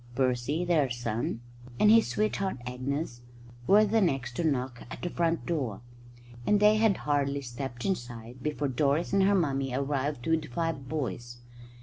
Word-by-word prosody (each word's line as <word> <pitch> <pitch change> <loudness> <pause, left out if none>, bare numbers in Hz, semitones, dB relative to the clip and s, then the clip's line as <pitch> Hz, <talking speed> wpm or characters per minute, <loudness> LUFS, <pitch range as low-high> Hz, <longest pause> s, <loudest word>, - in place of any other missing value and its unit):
Percy, 130 +6 0
their 155 -6 +2
son, 115 -1 -3 0.4
and 210 - +6
his 225 0 +6
sweetheart 200 -4 -1
Agnes 125 +1 -3 0.5
were 210 +2 +6
the 220 +2 +2
next 135 -9 0
to - - 0
knock 130 -5 -1
at - - -8
the 175 - -2
front 170 -1 0
door; 135 - -2 0.6
and 205 +10 +3
they 210 +1 +5
had 215 -3 +3
hardly 140 -1 +1
stepped 120 -1 -6
inside 120 -8 -4
before 150 0 -1
Doris 140 +6 +1
and 200 - +4
her 200 +1 +4
mummy 135 -7 0
arrived 140 -1 -1
with 160 0 +2
the 155 - -9
five 145 -1 -3
boys. 120 -5 -4
140 Hz, 160 wpm, -29 LUFS, 125-170 Hz, 0.6 s, and